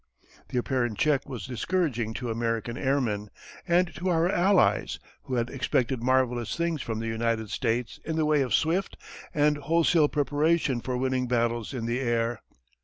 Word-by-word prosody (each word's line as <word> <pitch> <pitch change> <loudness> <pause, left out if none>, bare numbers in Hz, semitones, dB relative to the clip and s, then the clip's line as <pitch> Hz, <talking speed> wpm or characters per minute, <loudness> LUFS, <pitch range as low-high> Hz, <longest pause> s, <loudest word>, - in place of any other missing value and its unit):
The - - -3
apparent 120 -3 0
check 145 -3 +1
was 120 -9 -5
discouraging 125 -4 -1
to 125 -3 -3
American 115 0 -2
airmen, 120 -7 0 0.4
and 175 0 +2
to 185 +2 -1
our 165 -1 +3
Allies 185 +1 +3 0.3
who 130 - -3
had 120 0 -1
expected 130 -2 0
marvellous 125 -2 +1
things 170 -3 -1
from 115 -2 -3
the 115 - -4
United 115 -1 -1
States 120 -2 -1
in 160 - -3
the 160 -1 +1
way 150 -1 +3
of 130 -3 -1
swift 165 - +1 0.3
and 150 0 +2
wholesale 160 +1 +3
preparation 145 -2 +1
for 125 0 -2
winning 130 0 0
battles 120 -2 0
in 125 -4 -4
the 120 +2 -1
air. 120 -2 0
130 Hz, 165 wpm, -27 LUFS, 115-155 Hz, 0.4 s, our